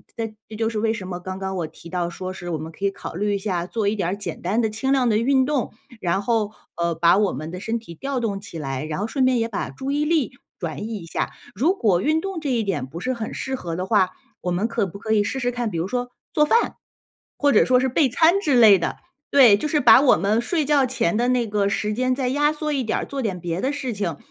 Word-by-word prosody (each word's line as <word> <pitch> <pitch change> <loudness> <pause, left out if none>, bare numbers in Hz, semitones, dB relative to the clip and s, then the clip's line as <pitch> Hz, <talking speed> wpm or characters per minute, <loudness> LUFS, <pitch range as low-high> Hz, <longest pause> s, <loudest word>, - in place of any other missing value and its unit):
这 225 -2 -4
这 220 - -9
就 225 0 0
是 225 - -4
为 220 +1 +1
什 190 -5 -6
么 180 -1 -5
刚 185 +1 -6
刚 190 0 -3
我 170 - -1
提 170 +2 -12
到 175 -1 -1
说 185 +2 -6
是， 175 -2 -6
我 160 - -2
们 160 +1 -7
可 195 - -5
以 200 - +2
考 195 -3 -8
虑 205 +2 0
一 200 - -1
下 180 -4 -2
做 210 +1 -2
一 210 - +1
点 180 -4 -1
儿 195 - -1
简 190 -6 -6
单 210 +7 +1
的 220 - +1
轻 245 +6 -2
量 260 -3 +3
的 215 - +3
运 260 +3 +3
动， 280 -2 -1 0.3
然 180 +3 0
后， 220 -1 0 0.2
呃， 170 0 0
把 170 +3 +4
我 205 -2 +2
们 155 +5 -5
的 180 +1 -6
身 225 +3 -2
体 170 -7 -11
调 275 - -3
动 205 -4 -2
起 180 -5 -9
来， 135 -1 -3
然 155 +3 -4
后 210 - -1
顺 260 +2 +1
便 255 -2 +3
也 230 - 0
把 205 - -3
注 270 +1 -6
意 295 +1 +1
力 305 -6 +1 0.3
转 160 -2 -4
移 225 0 -4
一 170 - -9
下。 - - -2 0.2
如 330 +9 +2
果 205 - +2
运 315 +6 +1
动 390 -3 -4
这 290 -3 -2
一 235 -3 +1
点 195 -10 -2
不 155 +6 -8
是 255 - -2
很 230 -3 -4
适 265 0 -3
合 170 -9 -5
的 180 - -2
话， 190 -4 +3 0.3
我 180 - -2
们 185 +6 0
可 230 -2 0
不 195 +2 -9
可 220 +1 -1
以 210 -1 +4
试 265 +6 -3
试 245 -1 0
看 240 -3 -2
比 165 - -2
如 170 - -1
说 245 +2 -3 0.2
做 300 - +3
饭？ 460 +10 +2 0.6
或 285 -1 +4
者 - - +5
说 250 0 +4
是 260 +1 +1
备 280 +3 +3
餐 335 +9 +4
之 290 -10 +2
类 215 -5 +8
的， - - -2 0.4
对， 250 -8 +7
就 300 - -2
是 300 0 +1
把 245 -2 +8
我 275 - +5
们 210 +3 +1
睡 305 +4 0
觉 285 -2 +3
前 210 -7 0
的 240 +1 +1
那 250 -2 +2
个 205 -1 +1
时 210 +1 -1
间 255 +2 +1
再 255 -2 -1
压 295 +3 +2
缩 305 0 -3
一 270 -3 0
点 220 - -1
儿， - - -3
做 275 -1 -4
点 195 -6 -2
别 175 +1 -3
的 270 - 0
事 265 -5 -3
情， 180 -7 -3
220 Hz, 305 characters per minute, -23 LUFS, 185-260 Hz, 0.6 s, 类